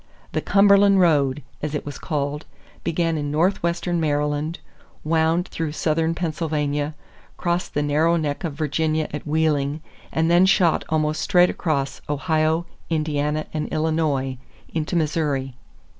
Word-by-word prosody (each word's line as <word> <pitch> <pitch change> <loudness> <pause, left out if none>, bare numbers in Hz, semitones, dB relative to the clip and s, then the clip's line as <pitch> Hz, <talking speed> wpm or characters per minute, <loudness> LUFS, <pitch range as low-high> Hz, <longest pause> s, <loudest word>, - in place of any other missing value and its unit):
The - - -1
Cumberland 200 0 +5
Road, 145 -5 +3 0.2
as 150 0 -3
it 150 - -3
was 145 - -7
called, 145 0 -3 0.4
began 165 -1 0
in 145 -1 -2
northwestern 170 +2 0
Maryland, 150 +1 0 0.5
wound 165 +3 +1
through 160 -2 -3
southern 160 +1 0
Pennsylvania, 150 -3 -2 0.4
crossed 175 0 -2
the 145 - +1
narrow 155 +4 +2
neck 150 +1 -2
of 165 -4 -2
Virginia 155 +1 0
at 150 - -5
Wheeling, 150 -1 +1 0.3
and 160 +1 +1
then 175 +2 +6
shot 180 -4 +3
almost 155 -1 0
straight 180 -2 +4
across 140 -5 -2
Ohio, 155 +2 +1 0.2
Indiana, 150 -1 -1
and 155 -1 -2
Illinois, 155 -5 0 0.3
into 160 +2 -2
Missouri. 150 -5 0
155 Hz, 130 wpm, -23 LUFS, 150-165 Hz, 0.5 s, then